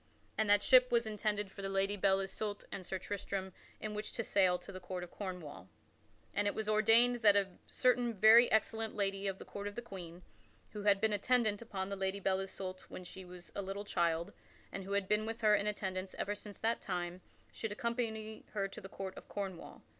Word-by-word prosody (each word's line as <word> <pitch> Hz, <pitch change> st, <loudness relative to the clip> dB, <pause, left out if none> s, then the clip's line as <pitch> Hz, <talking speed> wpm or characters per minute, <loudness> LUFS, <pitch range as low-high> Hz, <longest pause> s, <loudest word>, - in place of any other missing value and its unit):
And 220 Hz, -1 st, +1 dB
that 205 Hz, 0 st, +6 dB
ship 255 Hz, -1 st, +6 dB
was 235 Hz, -1 st, +3 dB
intended 210 Hz, -2 st, -1 dB
for 200 Hz, -, -9 dB
the 195 Hz, -, -3 dB
Lady 195 Hz, +1 st, +1 dB
Belle 195 Hz, -1 st, +3 dB
Isoult 205 Hz, +2 st, -4 dB
and 190 Hz, -, -5 dB
Sir 190 Hz, -, -3 dB
Tristram 190 Hz, -1 st, -4 dB, 0.3 s
in 215 Hz, -1 st, -4 dB
which 210 Hz, 0 st, -5 dB
to 230 Hz, -, -2 dB
sail 185 Hz, -4 st, +3 dB
to 175 Hz, +2 st, -11 dB
the 185 Hz, -, -7 dB
court 180 Hz, 0 st, -5 dB
of 175 Hz, -, -9 dB
Cornwall. 180 Hz, -, -7 dB, 0.6 s
And 205 Hz, 0 st, +1 dB
it 205 Hz, -, 0 dB
was 220 Hz, -1 st, -3 dB
ordained 225 Hz, +3 st, +5 dB
that 210 Hz, -3 st, +6 dB
a 200 Hz, -1 st, +3 dB, 0.2 s
certain 245 Hz, -2 st, +2 dB
very 220 Hz, +4 st, +8 dB
excellent 220 Hz, +1 st, +1 dB
lady 195 Hz, -1 st, 0 dB
of 195 Hz, -1 st, -2 dB
the -, -, -10 dB
court 200 Hz, 0 st, -6 dB
of 205 Hz, -, -6 dB
the 240 Hz, -, -3 dB
Queen, 180 Hz, -5 st, -9 dB, 0.5 s
who 210 Hz, -, -6 dB
had 200 Hz, -1 st, +4 dB
been 220 Hz, -1 st, +3 dB
attendant 215 Hz, 0 st, +2 dB
upon 195 Hz, -4 st, -4 dB
the 200 Hz, -, -2 dB
Lady 190 Hz, 0 st, -1 dB
Belle 190 Hz, -1 st, +1 dB
Isoult 190 Hz, -1 st, -5 dB
when 185 Hz, -, -7 dB
she 190 Hz, +1 st, -9 dB
was 180 Hz, -1 st, -11 dB
a 200 Hz, -, -3 dB
little 195 Hz, +1 st, -5 dB
child 170 Hz, -3 st, 0 dB, 0.4 s
and 195 Hz, -, -5 dB
who 200 Hz, -, -4 dB
had 200 Hz, -1 st, +1 dB
been 210 Hz, +1 st, +2 dB
with 225 Hz, +1 st, -4 dB
her 215 Hz, -1 st, +5 dB
in 205 Hz, 0 st, +2 dB
attendance 190 Hz, -2 st, -3 dB
ever 205 Hz, -, -1 dB
since 205 Hz, -1 st, -10 dB
that 230 Hz, +1 st, 0 dB
time, 180 Hz, -1 st, -3 dB, 0.3 s
should 220 Hz, -, -4 dB
accompany 220 Hz, -1 st, -3 dB
her 200 Hz, -2 st, 0 dB
to 195 Hz, -, -10 dB
the 195 Hz, -, -9 dB
Court 190 Hz, -1 st, -6 dB
of -, -, -11 dB
Cornwall. 195 Hz, -4 st, -6 dB
200 Hz, 220 wpm, -35 LUFS, 190-215 Hz, 0.6 s, very